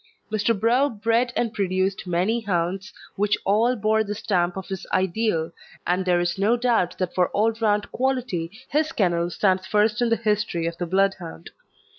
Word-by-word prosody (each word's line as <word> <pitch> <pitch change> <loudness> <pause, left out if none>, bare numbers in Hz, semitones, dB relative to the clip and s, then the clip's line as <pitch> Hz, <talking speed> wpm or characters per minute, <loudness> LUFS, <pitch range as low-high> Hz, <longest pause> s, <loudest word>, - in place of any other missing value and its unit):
Mr. 215 0 +1
Brough 245 +6 +3
bred 230 +2 0
and 230 -2 0
produced 190 -1 -1
many 180 +7 +1
hounds, 190 +1 -2 0.3
which 205 +1 +2
all 225 +5 +3
bore 220 0 +2
the 210 0 -4
stamp 180 -3 0
of 190 - -6
his 190 -1 -6
ideal, 185 -3 0 0.3
and 180 +2 +1
there 180 -1 +2
is 175 +2 -1
no 220 +5 +3
doubt 235 -7 +1
that 185 -2 -2
for 180 -1 +2
all 220 +2 +2
round 210 -2 +1
quality 250 -10 -1 0.2
his 310 +2 +1
kennel 175 - +1
stands 185 +1 +1
first 210 +3 +2
in 240 - +2
the 230 - +3
history 210 -6 -1
of 170 0 -2
the 175 - -2
Bloodhound. 190 - -1
200 Hz, 175 wpm, -24 LUFS, 180-225 Hz, 0.3 s, Brough